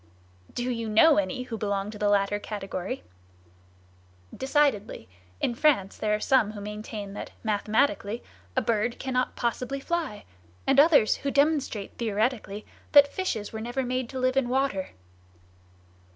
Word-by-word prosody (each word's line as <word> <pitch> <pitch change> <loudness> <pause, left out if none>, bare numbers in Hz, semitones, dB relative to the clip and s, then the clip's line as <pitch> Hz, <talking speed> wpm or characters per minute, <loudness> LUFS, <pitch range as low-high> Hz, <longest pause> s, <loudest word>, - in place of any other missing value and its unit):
"Do 240 - -3
you 230 -2 -3
know 290 +8 +6
any 265 -3 -2
who 230 -3 -6
belong 200 -1 -1
to 210 - -10
the 205 - +2
latter 205 0 +2
category?" 195 - -5 1.3
"Decidedly. 265 - 0 0.3
In - - 0
France 235 -7 +2
there 210 -1 0
are - - -3
some 215 -3 +2
who 210 - -7
maintain 210 -1 -6
that, - - -6
mathematically, 215 +1 0 0.3
a - - +2
bird 230 +1 0
cannot 255 -1 -1
possibly 250 +3 -2
fly; 320 -8 -3 0.4
and 275 0 +4
others 290 -7 +5
who 280 - -3
demonstrate 280 -8 0
theoretically 215 -1 -1 0.3
that 285 -1 +7
fishes 230 - -3
were 220 - -4
never 245 +3 -2
made 255 -1 -2
to 260 - -5
live 255 +1 +1
in 255 -3 +2
water." 255 -8 0
230 Hz, 145 wpm, -27 LUFS, 210-270 Hz, 1.3 s, that